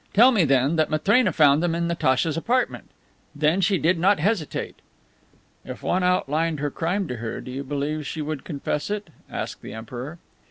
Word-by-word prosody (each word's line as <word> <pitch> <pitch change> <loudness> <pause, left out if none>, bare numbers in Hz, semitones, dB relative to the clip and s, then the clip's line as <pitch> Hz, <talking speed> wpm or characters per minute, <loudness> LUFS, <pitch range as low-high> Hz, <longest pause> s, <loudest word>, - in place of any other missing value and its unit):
Tell 240 +6 +8
me, 200 -9 +3
then, 135 +3 +2
that 155 - +2
Matrena 200 +8 +3
found 145 -1 +4
them 170 -1 0
in 170 0 -1
Natacha's 150 -2 +1
apartment. 245 +10 -1 0.5
Then, 155 +5 +2
she 190 +1 +3
did 170 +2 +2
not 195 +3 +4
hesitate!" 185 -2 -1 0.9
"If - - -9
one 185 - +1
outlined 165 -3 +1
her 145 0 -2
crime 180 +5 -1
to 125 - -4
her, 115 0 -5
do 125 - -8
you 135 +2 -4
believe 145 +2 -3
she 155 - -4
would 150 -2 -4
confess 145 0 -3
it?" 210 -5 -4 0.2
asked - - -5
the 105 - -8
Emperor. 125 +8 -7
160 Hz, 185 wpm, -24 LUFS, 145-180 Hz, 0.9 s, Tell